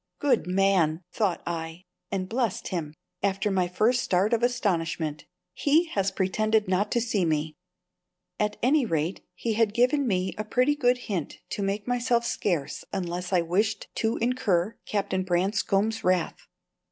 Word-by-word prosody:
"Good 260 -9 +1
man!" 185 -3 +2
thought 205 -6 0
I, 165 +1 -5 0.3
and 190 -2 -2
blessed 230 -2 -1
him 155 -4 -4 0.3
(after 200 +1 0
my 185 -2 +2
first 220 +7 +2
start 200 -1 +1
of 230 - +2
astonishment). 170 -10 -1 0.3
"He 320 +4 +2
has 195 -6 0
pretended 215 +3 +1
not 190 +3 +1
to 240 - +3
see 225 -5 0
me." 155 -1 0 0.9
At 210 0 0
any 280 +3 +4
rate 165 -4 -1
he 230 - -2
had 215 -1 +1
given 255 +3 +3
me 185 -3 0
a - - 0
pretty 255 +6 +2
good 250 -4 +3
hint 185 -9 -3
to - - -3
make 200 +2 -2
myself 240 -1 +1
scarce 170 -11 -1
unless 180 -1 -3
I 180 -2 +4
wished 200 +5 0
to 225 +1 0
incur 225 -6 +1
Captain 195 -2 -1
Branscome's 195 +4 0
wrath. 180 -2 0
200 Hz, 155 wpm, -27 LUFS, 180-235 Hz, 0.9 s, any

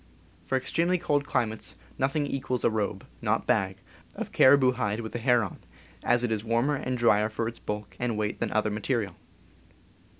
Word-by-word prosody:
For 130 - +1
extremely 170 +7 +1
cold 145 -5 0
climates 110 -5 -2 0.2
nothing 140 +3 +1
equals 130 -3 -2
a - - +4
robe 105 -1 -2 0.2
(not 115 0 0
bag) 95 -6 +1 0.4
of - - -5
caribou 130 -1 +6
hide 115 -3 -1
with 110 - -6
the 120 - -4
hair 120 -1 +3
on, 95 - -6 0.4
as 120 0 +2
it 120 - 0
is 110 -1 -1
warmer 115 +5 +1
and 130 -2 -2
drier 110 -3 +3
for 110 +1 -2
its 115 - -6
bulk 105 -2 -5
and 120 -3 -1
weight 105 -1 -2
than - - -1
any - - -1
other 105 0 +1
material. 105 -3 -1
115 Hz, 190 wpm, -28 LUFS, 105-130 Hz, 0.4 s, caribou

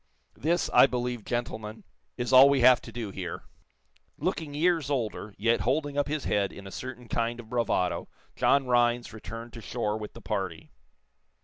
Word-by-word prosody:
This, 170 +4 0
I - - +8
believe, 125 -2 -3
gentlemen, 110 -3 -4 0.3
is 120 -1 -2
all 130 +2 +9
we 140 -2 +3
have 125 0 +7
to - - -10
do 115 -4 -5
here." 90 -3 -6 0.7
Looking 150 -3 -3
years 160 -2 +2
older, 110 -6 -3
yet 115 +3 +2
holding 145 +3 0
up 145 0 +1
his 150 -1 -2
head 100 -1 0
in 100 - -11
a 95 - -8
certain 125 0 -7
kind 115 +1 -1
of 115 -2 -10
bravado, 115 -7 0 0.3
John 140 -1 +3
Rhinds 120 -1 +2
returned 115 +3 -8
to 115 - -8
shore 110 -1 -2
with 105 - -7
the 115 - -11
party. 95 -5 -4
120 Hz, 175 wpm, -28 LUFS, 110-130 Hz, 0.7 s, all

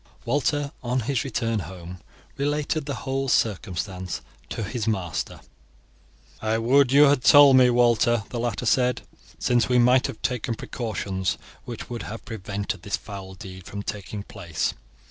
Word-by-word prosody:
Walter 145 +3 0
on 125 +1 0
his 130 +3 -1
return 115 -4 -1
home 90 0 -8 0.4
related 145 +1 -1
the 140 - -2
whole 135 0 -1
circumstance 95 -4 -1 0.3
to 115 - -3
his 110 +1 -3
master. 95 -6 -2 1.0
"I 110 +1 +1
would 125 +3 +4
you 140 +2 +7
had 140 -3 +4
told 140 0 +8
me, 125 -1 +7
Walter," 120 -2 +3
the 120 - -4
latter 120 0 -2
said, 125 +2 +2 0.3
"since 120 -1 +2
we 125 - +4
might 125 +1 +5
have - - -7
taken 125 -2 -1
precautions 100 -6 -3 0.3
which 120 -3 -7
would 120 - -4
have 110 +1 -7
prevented 100 -5 -4
this 100 +2 -2
foul 95 -2 -9
deed 95 0 -10
from 100 0 -6
taking 105 0 -5
place. 85 -4 -3
115 Hz, 150 wpm, -25 LUFS, 100-130 Hz, 1.0 s, told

